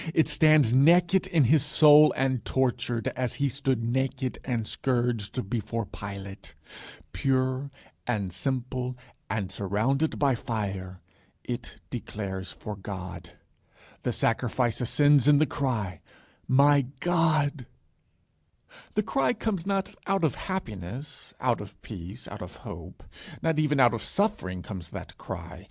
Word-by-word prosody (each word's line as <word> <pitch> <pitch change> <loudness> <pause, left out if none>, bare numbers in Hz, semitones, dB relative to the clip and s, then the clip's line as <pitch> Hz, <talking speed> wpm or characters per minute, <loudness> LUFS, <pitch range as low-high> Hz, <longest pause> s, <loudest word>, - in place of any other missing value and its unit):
It 160 - +4
stands 155 -7 +4
naked 175 +7 +5
in 160 -4 +3
his 145 +3 +4
soul 150 0 +7
and 130 -2 0
tortured, 125 -2 0
as 125 -1 -3
he 140 -1 +1
stood 135 -2 -1
naked 130 +2 -1
and 120 -4 -2
scourged 120 -3 -1
before 115 +1 -2
Pilate. 100 0 -8 0.6
Pure 130 +1 0 0.4
and 100 -7 -1
simple 125 +4 -2 0.3
and 100 -2 -2
surrounded 115 +10 0
by 140 -2 +3
fire, 95 -6 -4 0.4
it - - -5
declares 95 -3 -5
for 105 - -7
God. 95 -4 -7 0.7
The - - -1
sacrifice 120 0 +1
ascends 145 +2 +4
in 145 -1 +7
the 155 - +4
cry, 125 -10 -2 0.5
My 140 +1 +5
God. 155 -6 +1 1.3
The 210 - +2
cry 275 +4 +1
comes 210 -6 -2
not 195 -1 -1
out 195 -2 +1
of 155 -6 +3
happiness, 130 - -6
out - - +1
of - - -11
peace, 95 +8 -8
out - - -8
of - - -8
hope. - - -9 0.4
Not 160 -1 +2
even 150 -2 +2
out 120 -2 +6
of 115 - -3
suffering 195 - -1
comes 95 -5 -7
that - - -8
cry. - - -7
130 Hz, 130 wpm, -27 LUFS, 105-150 Hz, 1.3 s, soul